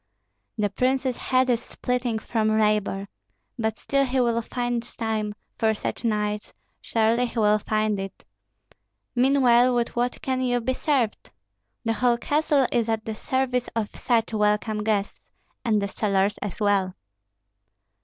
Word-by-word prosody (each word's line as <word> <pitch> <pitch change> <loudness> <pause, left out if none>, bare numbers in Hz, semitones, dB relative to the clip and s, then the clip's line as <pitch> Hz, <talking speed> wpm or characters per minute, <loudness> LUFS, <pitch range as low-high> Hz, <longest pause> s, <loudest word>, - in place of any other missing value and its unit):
"The 205 -2 0
prince's 260 +2 +1
head 255 +1 +1
is 235 - +1
splitting 250 -2 -2
from 220 -1 0
labor; 210 -2 +1 0.5
but 220 -1 -1
still 275 0 +1
he 265 0 0
will 235 -2 +2
find 240 0 -2 0.2
time 215 -2 -2 0.2
for 220 -1 +2
such 210 - -4
knights, 210 -2 -1 0.3
surely 230 +2 +2
he 235 - -9
will 210 -1 +4
find 215 -1 0
it. 195 0 -7 0.9
Meanwhile 250 -1 +4
with 235 -1 -1
what 245 +1 0
can 260 -1 0
you 245 -1 +1
be 260 +2 -1
served? 255 -6 0 0.6
The 225 - +2
whole 240 +2 +2
castle 290 +1 +2
is 230 -2 +1
at 220 -1 -1
the 220 - -3
service 250 +2 -1
of 220 -2 -2
such 230 -2 0
welcome 210 0 +1
guests, 210 -2 -1 0.4
and 220 -4 +2
the 200 - -1
cellars 200 0 0
as 205 +1 -5
well." 200 -3 +1
225 Hz, 145 wpm, -25 LUFS, 210-250 Hz, 0.9 s, will